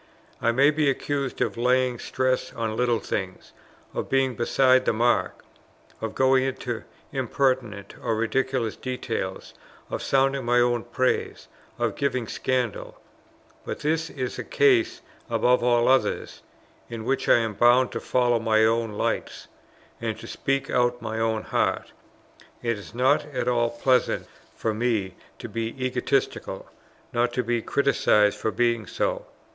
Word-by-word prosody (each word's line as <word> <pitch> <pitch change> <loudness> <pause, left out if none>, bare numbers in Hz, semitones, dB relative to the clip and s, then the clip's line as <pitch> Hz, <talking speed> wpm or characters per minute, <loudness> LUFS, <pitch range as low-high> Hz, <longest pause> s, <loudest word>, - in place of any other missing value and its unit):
I 115 - +3
may 140 +5 +4
be 150 -1 +2
accused 140 0 -2
of - - 0
laying 125 0 +2
stress 130 -1 -1
on 110 -1 -3
little 120 0 +2
things, 95 -2 -5 0.4
of - - -4
being 135 -1 +2
beside 130 +2 +3
the - - +2
mark, 120 +2 +1 0.6
of 110 -1 -4
going 130 0 +4
into 125 -3 -4 0.3
impertinent 130 -6 -1
or 115 - 0
ridiculous 120 0 0
details, 115 -7 -4 0.4
of - - -3
sounding 135 0 +1
my 120 +1 +3
own 120 -1 +1
praise, 125 +2 -1 0.3
of - - -1
giving 130 -4 -1
scandal; 125 0 -2 0.6
but - - -6
this 160 +1 0
is 130 -2 -4
a - - -3
case 370 -6 +2 0.3
above 125 0 +2
all 120 -1 +3
others, 130 0 +1 0.5
in 115 -2 -6
which 135 - 0
I - - +7
am 115 -2 -1
bound 120 +4 +4
to - - -3
follow 120 -2 +1
my 110 -1 +3
own 115 -1 +1
lights - - -3 0.5
and 110 -2 -2
to 115 - -10
speak 135 +3 -2
out 120 0 +2
my 110 -1 -4
own 110 -1 0
heart. - - -1 0.7
It 115 -1 0
is 105 - -12
not 125 +2 +3
at 130 -4 -3
all 120 -1 +2
pleasant 125 +2 +1 0.3
for 110 - -1
me 110 -4 -1 0.2
to - - -7
be 115 +1 -3 0.2
egotistical; 130 - -1 0.5
nor 120 0 +2
to 125 +1 -2
be 120 0 0
criticized 110 -6 +2
for - - 0
being 115 -2 0
so. - - -2
120 Hz, 150 wpm, -25 LUFS, 115-130 Hz, 0.7 s, I